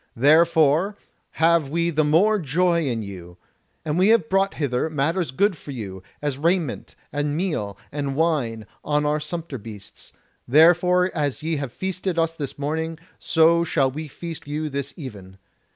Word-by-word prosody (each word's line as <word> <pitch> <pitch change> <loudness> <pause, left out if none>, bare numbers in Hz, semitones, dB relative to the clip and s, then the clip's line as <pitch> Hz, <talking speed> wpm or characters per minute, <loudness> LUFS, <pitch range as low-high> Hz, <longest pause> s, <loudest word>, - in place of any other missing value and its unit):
Therefore 160 - +4 0.4
have 165 -2 +3
we 170 +3 0
the 155 -1 +2
more 190 +9 +3
joy 170 +1 +1
in 115 -4 -2
you. 90 -3 -10 0.5
And 155 +2 0
we 185 - +5
have 220 -8 +3
brought 195 +1 +1
hither 140 0 -1
matters 160 +4 0
good 195 +9 +1
for 150 - -13
you, 100 -8 -6 0.2
as 140 -2 -2
raiment, 165 -3 -1 0.2
and 145 +1 -1
meal, 130 - -2
and 140 -2 -3
wine, 135 -9 0 0.2
on 150 0 0
our 150 +1 +1
sumpter 155 -3 -6
beasts; 105 -2 -11 0.4
therefore 175 +5 +5
as 145 -3 -2
ye 160 0 -1
have 140 -3 -4
feasted 185 +1 -3
us 165 0 +1
this 145 -4 -5
morning, 160 +3 -3 0.2
so 165 +1 +4
shall 140 -5 +1
we 155 +3 -6
feast 165 +2 -8
you 150 +1 -3
this 140 0 -4
even. 100 - -9
155 Hz, 160 wpm, -23 LUFS, 135-170 Hz, 0.5 s, we